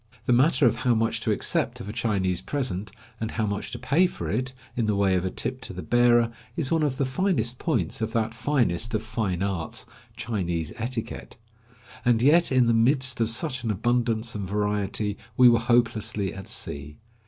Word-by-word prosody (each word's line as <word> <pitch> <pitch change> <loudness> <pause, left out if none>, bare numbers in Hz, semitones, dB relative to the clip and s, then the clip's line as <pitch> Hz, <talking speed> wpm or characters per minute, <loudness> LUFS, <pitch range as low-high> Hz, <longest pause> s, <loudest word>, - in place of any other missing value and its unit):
The 125 - +3
matter 135 +2 +4
of 120 -1 +3
how 120 +1 +2
much 115 0 0
to - - 0
accept - - 0
of - - -7
a 105 - -5
Chinese 100 -6 0
present, 110 -8 -2 0.3
and 110 - -2
how 110 -1 -1
much 100 -1 -3
to - - -6
pay 175 +6 +3
for - - -6
it, 125 +5 -1 0.2
in 115 -3 0
the 105 - +1
way 100 -1 +2
of 90 -1 +1
a - - 0
tip 130 +7 -4
to 125 - -6
the 95 - -6
bearer, 120 -1 +4 0.3
is 145 -5 -2
one 165 -1 +2
of 145 -4 0
the 140 - +1
finest 130 - 0
points 95 -2 -1
of 110 0 -1
that 115 -1 0
finest 115 -4 0
of 110 - -1
fine 100 -5 -2
arts, 95 -5 -4 0.3
Chinese 85 -8 -2
etiquette; 115 0 -5 0.7
and 120 -2 +3
yet 165 +4 +5
in 130 -2 +4
the 115 - +3
midst 130 +2 +2
of 110 - +2
such 130 +1 0
an 115 - -2
abundance 115 +1 0
and 100 -3 -4
variety 105 0 -1 0.2
we 125 - +8
were 115 -1 +5
hopelessly 110 -4 +1
at 95 -1 -9
sea. 70 +1 -4
115 Hz, 200 wpm, -26 LUFS, 105-125 Hz, 0.7 s, we